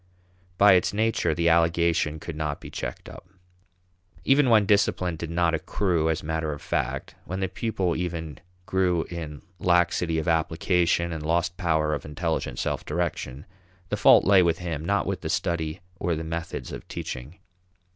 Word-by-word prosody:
By 100 +1 +7
its 90 +2 +2
nature, 110 -7 +1
the 85 +1 +1
allegation 85 -1 +2
could 80 +1 -7
not 75 -2 -3
be - - -10
checked - - -6
up. - - -11 1.0
Even 135 -1 +4
when 110 -3 +5
discipline 95 -3 +2
did 85 0 -6
not 85 0 +1
accrue 80 -1 0
as 80 - -1
matter 80 0 -2
of 70 - -8
fact, 85 - -2
when 95 +3 -4
the 95 - 0
pupil 95 -5 -1
even 80 -4 -4 0.3
grew 90 -3 +1
in 80 -4 -6 0.2
laxity 85 -1 +2
of 80 - -2
application 85 +1 +1
and 80 -1 -5
lost 85 +2 0
power 80 -3 +1
of - - -3
intelligent 75 -4 -3
self - - -2
direction, 75 -4 -3 0.4
the - - 0
fault - - +6
lay 95 -1 +6
with 85 -2 +2
him, 85 -4 -4
not 100 +4 +1
with - - -3
the - - -4
study 85 0 -1 0.2
or 85 -2 0
the 80 - -4
methods 85 +1 -5
of - - -8
teaching. 65 +8 -6
85 Hz, 165 wpm, -26 LUFS, 80-90 Hz, 1.0 s, By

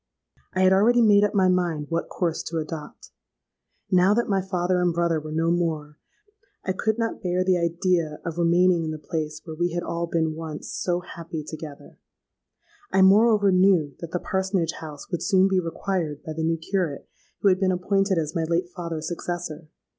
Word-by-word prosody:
I 185 - +2
had 185 0 +5
already 235 +5 +4
made 205 -2 +6
up 210 - +1
my 190 -2 +4
mind 175 -5 +1
what 165 0 -1
course 170 -3 -1
to 165 - -3
adopt. 155 -1 -7 0.8
Now 185 +3 +5
that 235 - +1
my 195 -2 +1
father 180 -1 0
and 175 -1 +2
brother 170 -1 +1
were 155 0 -8
no 165 +2 +1
more, 155 -4 -2 0.7
I 190 - 0
could 220 +4 -1
not 230 -1 -2
bear 180 -1 0
the 185 -1 +2
idea 170 -2 0
of 170 0 -4
remaining 175 0 +3
in 160 - -3
the 155 - -4
place 155 0 -4
where 160 -2 -7
we 175 +1 -1
had 175 0 -2
all 170 0 -3
been 160 -2 0
once 160 -1 -7
so 175 -1 -1
happy 165 -2 -7
together: 155 -1 -10 0.9
I 190 - +4
moreover 205 +1 +5
knew 185 -6 +3
that 170 - -6
the 180 - -2
parsonage 190 -3 -1
house 150 0 -9
would 175 - -2
soon 190 0 +4
be 190 -1 +2
required 165 -3 -3
by 155 - -5
the 160 - -4
new 165 +1 +1
curate 165 -3 -2 0.3
who 200 - +5
had 185 -1 +2
been 190 -1 +2
appointed 195 +1 +1
as 155 -2 -1
my 165 -3 -1
late 170 +2 0
father's 170 -3 -5
successor. 170 -2 -5
175 Hz, 190 wpm, -24 LUFS, 160-185 Hz, 0.9 s, made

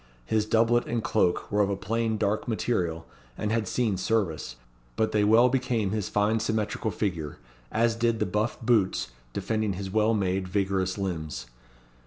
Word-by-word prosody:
His 110 - +1
doublet 115 +2 +3
and 115 -1 -1
cloak 90 -5 +1
were 105 0 +3
of 100 - +2
a 100 - 0
plain 115 +2 -1
dark 105 0 0
material, 90 -8 -1 0.3
and 105 - -2
had 110 -2 0
seen 110 -2 0
service; 90 - -1 0.4
but 110 - +1
they 105 -1 +2
well 115 +4 +6
became 125 -6 0
his 105 -3 -2
fine 105 +2 +2
symmetrical 110 0 -1
figure, 85 -9 -3 0.3
as 115 0 +2
did 115 0 +1
the 105 - 0
buff 105 +3 -1
boots 105 - +2 0.2
defending 110 - -1
his 95 +1 -5
well 110 +2 +3
made, 95 -2 0
vigorous 95 0 0
limbs. 80 -10 -3
105 Hz, 165 wpm, -27 LUFS, 95-115 Hz, 0.4 s, well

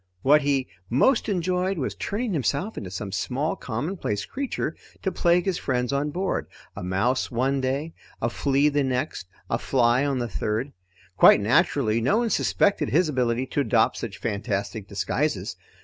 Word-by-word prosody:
What 150 +2 +6
he 140 -2 +1 0.2
most 225 - +3
enjoyed 185 0 0
was 135 - -2
turning 215 +1 -3
himself 150 - -1
into 95 - -6
some 95 +2 -5
small 135 +9 -1
commonplace 120 - -3
creature 275 -1 -3 0.3
to 190 - 0
plague 175 0 +2
his 190 -3 0
friends 125 0 -1
on 140 +2 0
board 185 +5 -2 0.3
a 100 - -6
mouse, 100 +8 0
one 135 +3 0
day, 140 +5 -2 0.3
a 115 - 0
flea 140 +4 +2
the 145 -1 +1
next, 130 - -2 0.2
a - - -1
fly 125 0 +2
on 140 -2 0
the 120 -1 -1
third. 110 +5 -2 0.4
Quite - - +8
naturally, 115 - +2
no 165 - +2
one 235 -1 0
suspected 200 -7 +2
his 165 +1 +3
ability 125 -2 0
to - - +1
adopt 120 -5 +2
such 110 -4 -5
fantastic 100 -1 -3
disguises. - - -1
135 Hz, 165 wpm, -25 LUFS, 115-165 Hz, 0.4 s, Quite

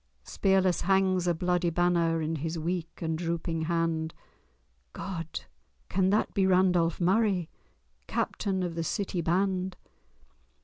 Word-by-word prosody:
Spearless 190 -2 +2
hangs 190 -1 +2
a 175 - +3
bloody 180 +1 +1
banner 170 -1 +2
In 160 +1 -1
his 160 +3 -3
weak 170 +1 -3
and 160 0 0
drooping 165 -1 -2
hand— 165 -1 -1 0.8
God! 165 -4 -5 0.5
can 190 0 +2
that 210 +2 +1
be 195 -1 +2
Randolph 180 -3 +3
Murray, 190 -1 +2 0.6
Captain 190 -3 -1
of 175 -2 -2
the 165 0 -2
city 180 +1 -2
band? 185 +2 0
175 Hz, 125 wpm, -29 LUFS, 165-190 Hz, 0.8 s, a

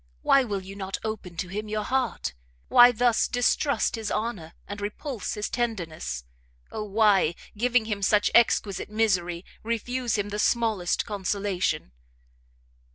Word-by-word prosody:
Why 275 -1 +5
will 205 -5 -3
you 195 +1 -9
not 195 -1 -4
open 210 -6 -5
to 180 - -2
him 210 +4 -5
your 215 0 -1
heart? 255 - -1 0.4
Why 245 0 +8
thus 240 0 +2
distrust 245 +4 +1
his 220 -2 -4
honour, 200 -8 -3
and 205 +1 -6
repulse 215 +3 -4
his 210 0 -2
tenderness? 175 - -3 0.5
Oh 215 - -4
why, 200 -5 +3 0.2
giving 245 +1 +2
him 210 -2 -3
such 205 +1 +3
exquisite 210 -5 +3
misery, 185 -5 0 0.2
refuse 235 +1 -1
him 205 0 -2
the 210 +1 -4
smallest 215 -6 +1
consolation?" 195 - -1
210 Hz, 140 wpm, -26 LUFS, 195-230 Hz, 0.5 s, Why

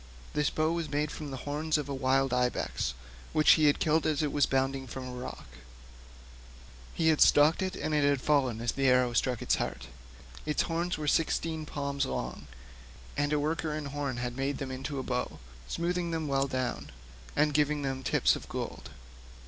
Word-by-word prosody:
This 150 -1 +2
bow 155 +1 +1
was 170 -2 -2
made 150 +1 -1
from 150 -2 -6
the 135 - -5
horns 150 +2 0
of 150 -2 -3
a 140 - -3
wild 135 0 +2
ibex 125 - 0 0.4
which 155 -1 +6
he 155 - +5
had 145 - +4
killed 160 0 +2
as 155 -1 +1
it 150 - 0
was 145 -1 +3
bounding 135 0 0
from 130 +2 -6
a - - -6
rock; 125 0 -7 1.5
he 160 -1 +3
had 155 - +2
stalked 150 +4 +6
it, 185 0 -2
and 155 - -2
it 150 -1 +3
had 140 -1 +3
fallen 130 -5 +1
as 120 0 0
the 135 -1 0
arrow 125 -1 +4
struck 125 0 0
it - - -11
to - - +4
the - - +2
heart. - - -6 0.6
Its 150 - +1
horns 170 +2 -1
were 150 -1 -4
sixteen 160 0 0
palms 140 -1 -2
long, - - -4 0.7
and 145 0 0
a 150 - +2
worker 155 +1 -1
in 155 -1 -4
horn 140 -3 -3
had 120 0 -3
made 135 +2 -1
them 135 -2 -5
into 135 +2 -4
a 130 - -2
bow, 125 -1 -2 0.3
smoothing 175 0 -1
them 160 -2 -2
well 135 0 +1
down, 125 - -3 0.5
and 150 0 +3
giving 150 0 +2
them 135 -1 -2
tips 130 - +3
of - - -9
gold. - - -5
145 Hz, 200 wpm, -30 LUFS, 130-155 Hz, 1.5 s, which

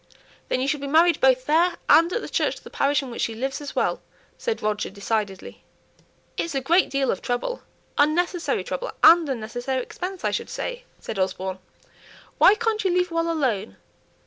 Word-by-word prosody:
"Then - - 0
you 260 - -1
shall 295 +1 0
be 280 - -5
married 330 +4 +4
both 255 -1 +4
there 335 +5 +3
and 335 +2 +6
at 465 - -1
the - - -5
church - - 0
of - - -15
the - - -12
parish 285 +1 +1
in 260 - -7
which 235 - -5
she 225 - -1
lives 270 +5 -3
as 290 - -7
well," - - 0 0.3
said 465 -2 -3
Roger, 210 0 -1
decidedly. 200 -1 -4 0.7
"It's 330 -3 -2
a - - +2
great 340 +8 +3
deal 275 -1 +1
of 190 - -4
trouble, 245 - -2 0.4
unnecessary 340 +4 +1
trouble, - - -4
and 330 -3 +7
unnecessary 245 +2 -3
expense, 365 +6 -6
I - - +1
should - - -3
say," - - -5
said 210 - -6
Osborne. 185 0 -2 0.8
"Why 400 - +7
can't 445 -1 -1
you 380 - +2
leave 360 0 +1
well 330 0 0
alone? 235 - -1
285 Hz, 190 wpm, -24 LUFS, 240-350 Hz, 0.8 s, and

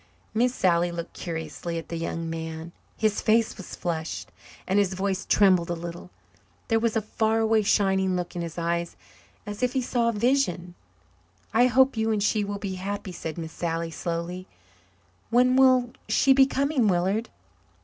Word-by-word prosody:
Miss 245 +3 +2
Sally 175 -1 +2
looked 170 -1 -6
curiously 165 0 -5
at 165 - -7
the 170 - -4
young 165 0 -3
man. 160 0 -5 0.3
His 215 -2 +1
face 225 +1 +2
was 190 - -9
flushed 160 -2 -4 0.3
and 195 +2 +2
his 190 -2 +1
voice 190 0 -2
trembled 185 -4 +4
a 175 - -1
little. 170 +1 -7 0.6
There 225 -1 +3
was 230 0 0
a 220 - +1
far 220 +1 0
away 220 -1 +3
shining 190 -3 +2
look 180 0 -4
in 175 - -2
his 165 -1 -6
eyes 170 0 -1 0.5
as 205 +2 -6
if 250 -1 +1
he 265 - +1
saw 240 -1 +1
a - - -1
vision. 210 -7 0 0.8
"I 245 +3 +5
hope 260 +1 +4
you 220 0 +1
and 210 -2 0
she 210 0 +2
will 200 0 -3
be 200 -2 -4
happy," 200 0 -4
said 160 -2 -6
Miss 160 -1 -5
Sally 165 -1 -2
slowly. 175 +2 -4 0.8
"When 250 +2 +4
will 255 -2 +5 0.2
she 270 - +5
be 265 0 +6
coming, 275 -3 +1
Willard?" 195 +5 +1
195 Hz, 175 wpm, -26 LUFS, 170-225 Hz, 0.8 s, be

